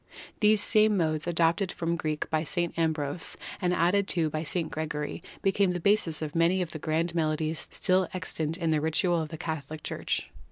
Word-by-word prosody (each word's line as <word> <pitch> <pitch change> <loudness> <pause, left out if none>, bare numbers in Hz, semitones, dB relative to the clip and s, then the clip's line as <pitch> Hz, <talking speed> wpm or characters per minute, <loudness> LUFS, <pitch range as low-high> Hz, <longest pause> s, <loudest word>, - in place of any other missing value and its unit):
These 210 -1 +4
same 215 -1 +4
modes, 155 -2 0
adopted 170 +3 +2
from 170 0 -3
the 170 - 0
Greek 155 -2 -2
by 155 0 +1
St. 170 +2 -1
Ambrose 160 -1 -1 0.2
and 180 -1 +1
added 180 +3 +2
to 165 -4 +1
by 155 - -2
St. 165 +1 -2
Gregory, 150 -1 -4 0.2
became 195 -1 +2
the 175 - -2
basis 170 -4 +2
of 150 -1 -4
many 170 +3 +3
of 175 -3 -2
the 155 - -6
grand 165 +3 0
melodies 155 -1 -1
still 185 0 +2
extant 165 -3 -3
in 165 -3 0
the 155 -1 +2
ritual 165 +2 +1
of 155 - -5
the 160 - -7
Catholic 155 -1 -5
Church. - - -3
165 Hz, 195 wpm, -28 LUFS, 155-180 Hz, 0.2 s, These